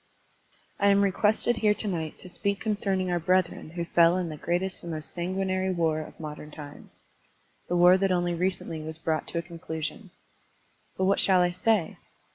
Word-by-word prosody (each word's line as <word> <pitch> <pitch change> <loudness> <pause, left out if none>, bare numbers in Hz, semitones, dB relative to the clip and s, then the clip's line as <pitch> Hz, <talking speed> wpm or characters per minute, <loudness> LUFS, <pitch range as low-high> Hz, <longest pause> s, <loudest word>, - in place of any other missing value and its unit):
I 200 - +3
AM 200 0 +4
requested 215 +4 +4
here 210 -1 +2
to 215 - -4
night 160 -5 -3
to 185 - -8
speak 200 +3 -2
con 220 - 0
cerning 190 -3 -1
our 175 - +1
brethren 180 -1 0
who 170 -1 -2
fell 170 +1 +4
in 180 -2 -2
the 155 - -6
greatest 175 +5 -2
and 170 - -7
most 155 -1 -4
sanguinary 185 +1 -1
war 165 -3 0
of 155 - -9
modem 150 -1 -8
times, 145 -1 -11 0.3
— - - -40
the 175 - 0
war 180 +2 +6
that 195 0 +1
only 175 -1 +1
recently 170 -2 -2
was 160 0 0
brought 160 -1 -2
to - - -5
a 170 - -1
conclu 165 -2 -7
sion. 150 - -5 0.9
But 190 - +1
what 195 +1 +2
shall 185 -2 +4
I 175 0 +2
say? 185 -1 0
175 Hz, 200 wpm, -27 LUFS, 165-190 Hz, 0.9 s, war